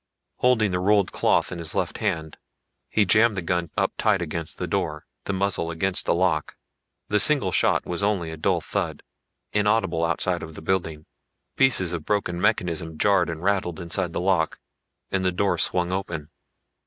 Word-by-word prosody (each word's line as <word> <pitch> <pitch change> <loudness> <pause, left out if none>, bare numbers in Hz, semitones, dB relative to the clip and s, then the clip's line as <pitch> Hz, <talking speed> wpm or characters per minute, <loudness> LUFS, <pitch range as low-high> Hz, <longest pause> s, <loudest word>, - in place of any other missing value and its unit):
Holding 115 -5 +3
the 90 - 0
rolled 100 0 +3
cloth - - +1
in 90 - -5
his 85 -2 -4
left - - -1
hand, 80 -2 -2 0.5
he 105 - +3
jammed 110 +2 +4
the 90 - -2
gun 85 -1 -1
up - - +1
tight 105 -3 +3
against 85 -1 -4
the - - -3
door, 75 0 -2 0.2
the - - -1
muzzle 95 -3 0
against 90 +3 -1
the - - +3
lock. 85 -3 0 0.5
The 105 - +2
single 130 -6 +2
shot - - +2
was 90 +2 -3
only 100 -5 0
a - - -6
dull 75 - +1
thud, - - -3 0.5
inaudible 105 -5 +1
outside 85 +1 0
of 80 0 -8
the - - -8
building. 80 -4 -1 0.5
Pieces 95 -10 +3
of 85 -3 -4
broken 90 -3 -1
mechanism 85 -6 0
jarred 95 -2 +3
and 80 0 -5
rattled 95 -4 0
inside 90 +1 -2
the - - -3
lock 90 -3 +1 0.5
and 95 -1 0
the 90 - +2
door 95 +3 0
swung 90 0 +1
open. 85 -5 -4
90 Hz, 180 wpm, -24 LUFS, 85-100 Hz, 0.5 s, jammed